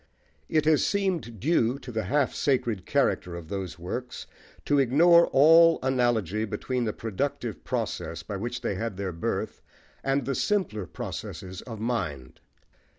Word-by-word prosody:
It 155 -1 +2
has 155 -1 +4
seemed 185 - -1
due 130 - +2
to 125 -2 -9
the 110 -2 -2
half 140 +6 +1
sacred 120 -8 0
character 90 -1 +1
of 85 -2 -9
those 95 -4 -4
works 120 +9 -5 0.4
to 145 -1 +3
ignore 170 +7 +6
all 165 +4 +6
analogy 120 -6 +1
between 120 +4 -2
the 110 - 0
productive 110 -2 -4
process 85 +1 -3
by 100 +4 -5
which 120 +4 -4
they 115 - -1
had 105 0 -4
their 100 -2 -3
birth, 85 - -3 0.4
and 135 -1 0
the 135 - -1
simpler 125 - -1
processes 95 +1 -7
of 115 -3 -7
mind. 75 - -3
120 Hz, 150 wpm, -27 LUFS, 100-140 Hz, 0.4 s, ignore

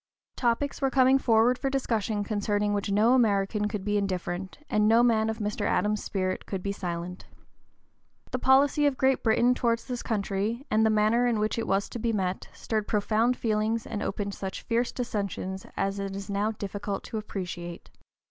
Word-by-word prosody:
Topics 245 +3 0
were 270 - +2
coming 265 0 +4
forward 235 +1 +3
for 270 - 0
discussion 225 -6 -1
concerning 205 0 0
which 205 0 -1
no 215 +5 +4
American 210 -3 +2
could 210 -2 -4
be 205 0 +1
indifferent, 185 -1 -3
and 210 0 +2
no 230 +2 +5
man 220 -2 +3
of 220 - -2
Mr. 210 -1 -3
Adams's 210 0 +1
spirit 185 -1 -2
could 190 -2 -4
be 200 - -1
silent. 180 -2 -5 1.0
The 255 - -1
policy 280 +3 +4
of 275 -2 0
Great 265 +1 +2
Britain 235 +2 +3
towards 235 -2 0
this 245 -2 -4
country, 210 +3 -2
and 220 +1 +4
the 220 - +4
manner 215 +3 +3
in 235 -2 +1
which 215 +2 0
it 230 - -3
was 195 +1 +1
to 240 - -6
be 230 0 0
met, 185 -3 -2
stirred 215 -2 -3
profound 220 +4 +1
feelings 220 0 0
and 210 -2 -4
opened 200 -2 -3
such 190 -1 -6
fierce 235 +1 0
dissensions 200 -5 -4
as 195 +1 -1
it 195 -1 -4
is 200 +1 -6
now 200 +2 +1
difficult 205 -2 -4
to 220 - -4
appreciate. 180 -4 -6
215 Hz, 185 wpm, -27 LUFS, 200-235 Hz, 1.0 s, no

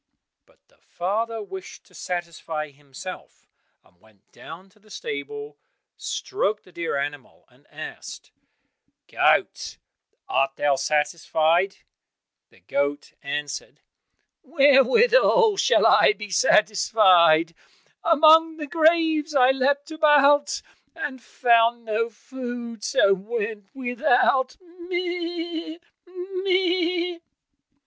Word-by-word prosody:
But - - -28
the - - -32
father 220 +5 -3
wished 190 -1 -10
to - - -25
satisfy 165 -4 -5
himself, 145 +5 -11 0.4
and 90 +1 -30
went 110 -3 -27
down 180 +4 -12
to 200 - -28
the 215 +1 -24
stable, 435 - -7 0.4
stroked 215 - -3
the 185 - -20
dear 170 -4 -3
animal 145 -1 -6
and - - -28
asked, - - -10 0.8
"Goat, - - 0 0.5
art 135 0 0
thou 145 -1 +1
satisfied?" 160 +5 0 0.7
The - - -25
goat 140 +9 -3
answered, 145 0 -6 0.6
"Wherewithal 445 - +4
should - - +3
I - - +5
be 210 - -10
satisfied? 180 -6 +3 0.5
Among 320 0 +5
the 300 - -5
graves 320 -1 +1
I 255 -1 +5
leapt 280 +3 -1
about, 290 -2 +3 0.3
And 280 -6 -6
found 235 0 +1
no 225 +1 -1
food, 240 -1 -8
so 195 - +3
went 210 +1 -5
without, 260 0 +1
meh! 345 -2 -5 0.3
meh!" 360 -1 -1
245 Hz, 100 wpm, -23 LUFS, -, 0.8 s, I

